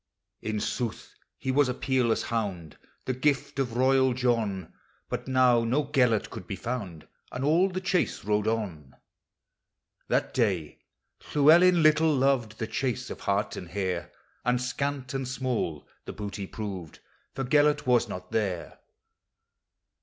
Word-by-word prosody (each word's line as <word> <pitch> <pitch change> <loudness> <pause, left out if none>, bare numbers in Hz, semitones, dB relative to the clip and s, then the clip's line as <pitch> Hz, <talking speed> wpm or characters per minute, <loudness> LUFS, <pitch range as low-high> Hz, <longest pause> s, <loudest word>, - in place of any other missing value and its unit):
" - - -55
In 105 - -1
sooth, 120 +1 -3 0.2
he 130 - -2
was 140 0 +3
a 125 - -1
peerless 125 -4 +1
hound, 95 -9 -3 0.3
The 130 - 0
gift 140 +1 0
of 120 -3 -1
royal 130 0 +4
John; 110 -8 0 0.4
But - - -4
now 125 -2 +4
no 130 +6 +1
Gelert 125 -6 +2
could 90 - -8
be 100 - -3
found, 95 -7 -5 0.2
And 125 +2 -3
all 170 +6 +4
the 185 0 -4
chase 185 -1 0
rode 105 +1 0
on. 95 -12 -3 1.1
That - - 0
day 95 - 0 0.6
Llewellyn 170 +4 +6
little 155 0 +5
loved 130 -5 +1
The 110 - -2
chase 125 +1 -2
of - - -7
haH 100 0 0
and 90 - -7
hare; 95 -3 -3 0.3
And 125 0 +2
scant 130 +1 -3
and 135 -1 -2
small 125 - -2 0.2
the - - -6
booty 100 -2 -5
proved, 95 -8 -6 0.4
For 135 - -2
Gelert 145 +3 +3
was 120 -2 +3
nol 90 -2 -6
there. 95 -6 -2
125 Hz, 145 wpm, -28 LUFS, 105-135 Hz, 1.1 s, Llewellyn